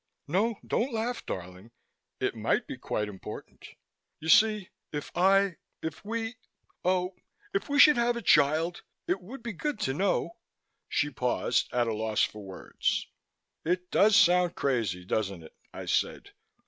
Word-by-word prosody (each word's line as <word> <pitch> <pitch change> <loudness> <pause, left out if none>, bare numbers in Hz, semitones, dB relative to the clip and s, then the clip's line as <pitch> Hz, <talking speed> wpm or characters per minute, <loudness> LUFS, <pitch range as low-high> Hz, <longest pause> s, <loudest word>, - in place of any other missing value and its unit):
"No, 205 +8 +1
don't 255 +4 0
laugh, 230 +2 -2
darling. 90 +4 -6 0.5
It - - 0
might - - 0
be - - -6
quite 105 - -2
important. 100 -2 -9 0.5
You 160 - -5
see, 215 0 +5 0.2
if 145 -1 -5
I 195 0 +4 0.3
if 160 - -5
we 225 +2 -3 0.5
Oh, 180 +1 +1 0.4
if 395 - -1
we 285 - +1
should 295 -1 +8
have 240 0 +2
a - - -4
child, 155 +4 +3 0.3
it 180 +1 0
would 230 +7 -10
be 235 -2 -4
good 295 - -3
to 130 - 0
know 170 0 0 0.3
" - - -52
she 145 +1 0
paused, 125 -1 0
at 120 -1 +2
a 115 - -1
loss 110 0 0
for 105 -1 -3
words. 95 -1 -2 0.6
"It 180 +2 -1
does 210 +1 +5
sound 180 -1 +5
crazy, 110 -10 -1
doesn't 100 -4 -2
it?" 80 - -14 0.2
I - - -7
said. - - -1
180 Hz, 160 wpm, -29 LUFS, -, 0.6 s, should